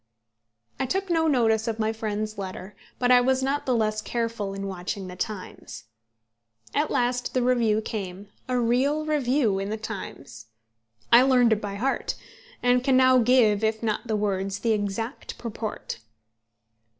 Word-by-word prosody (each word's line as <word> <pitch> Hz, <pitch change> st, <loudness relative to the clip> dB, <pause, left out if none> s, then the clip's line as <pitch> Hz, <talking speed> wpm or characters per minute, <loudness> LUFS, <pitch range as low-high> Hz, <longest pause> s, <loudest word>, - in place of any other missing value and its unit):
I 265 Hz, -, 0 dB
took 385 Hz, +5 st, -1 dB
no 325 Hz, -1 st, +2 dB
notice 225 Hz, -5 st, +2 dB
of 225 Hz, -1 st, -1 dB
my 220 Hz, 0 st, 0 dB
friend's 215 Hz, -1 st, -3 dB
letter, 190 Hz, +1 st, -6 dB, 0.2 s
but 245 Hz, 0 st, +2 dB
I 250 Hz, 0 st, +7 dB
was 260 Hz, +1 st, +1 dB
not 275 Hz, +2 st, -1 dB
the 255 Hz, -, +2 dB
less 215 Hz, -1 st, 0 dB
careful 230 Hz, -4 st, -3 dB
in 195 Hz, 0 st, -4 dB
watching 190 Hz, +1 st, -4 dB
The 180 Hz, 0 st, -8 dB
Times. 185 Hz, -, -6 dB, 0.9 s
At 295 Hz, +2 st, +1 dB
last 245 Hz, +1 st, 0 dB
the 255 Hz, -, +2 dB
review 235 Hz, -4 st, +2 dB
came, 200 Hz, -2 st, -6 dB, 0.2 s
a 250 Hz, -, +1 dB
real 265 Hz, +6 st, +1 dB
review 260 Hz, -8 st, +1 dB
in 195 Hz, +1 st, -3 dB
The 220 Hz, -, -2 dB
Times. 185 Hz, -, -8 dB, 0.6 s
I 235 Hz, -, +9 dB
learned 250 Hz, -3 st, +5 dB
it 215 Hz, -, -2 dB
by 200 Hz, -1 st, -4 dB
heart, 260 Hz, +7 st, -1 dB, 0.5 s
and 245 Hz, 0 st, +3 dB
can 260 Hz, -1 st, +3 dB
now 255 Hz, 0 st, +6 dB
give, 225 Hz, -4 st, +4 dB
if 220 Hz, +1 st, 0 dB
not 220 Hz, +2 st, -1 dB
the 220 Hz, -, 0 dB
words, 195 Hz, -1 st, -1 dB
the 230 Hz, -, +1 dB
exact 210 Hz, +4 st, -4 dB
purport. 220 Hz, -, -5 dB
225 Hz, 160 wpm, -25 LUFS, 205-250 Hz, 0.9 s, I